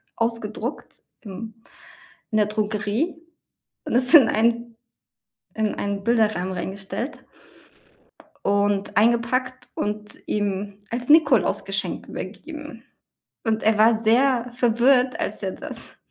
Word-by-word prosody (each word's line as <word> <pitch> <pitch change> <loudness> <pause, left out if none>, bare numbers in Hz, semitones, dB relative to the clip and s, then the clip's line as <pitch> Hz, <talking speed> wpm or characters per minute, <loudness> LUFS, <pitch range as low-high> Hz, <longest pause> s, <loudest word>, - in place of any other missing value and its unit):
ausgedruckt, 230 +2 -4 0.2
ähm, 220 +3 -9 0.7
in 215 - +1
der 210 - +3
Drogerie. 215 +9 -2 0.6
Und - - -3
es 250 +4 +5
in 280 -7 +9
ein 235 +1 0 0.8
in 220 -1 -1
einen 200 0 -3
Bilderrahmen 215 -6 +1
reingestellt 195 +8 -5 1.2
und 200 0 +1
eingepackt 240 +3 +1
und 210 0 -3 0.2
ihm 200 -1 -2
als 245 +2 -3
Nikolaus-Geschenk 220 - +2
übergeben. 295 - -8 0.6
Und 220 -1 0
er 220 0 +3
war 225 +2 +6
sehr 235 +2 +2
verwirrt, 250 +2 +3
als - - -2
er - - -1
das - - -5
225 Hz, 105 wpm, -23 LUFS, 205-245 Hz, 1.2 s, in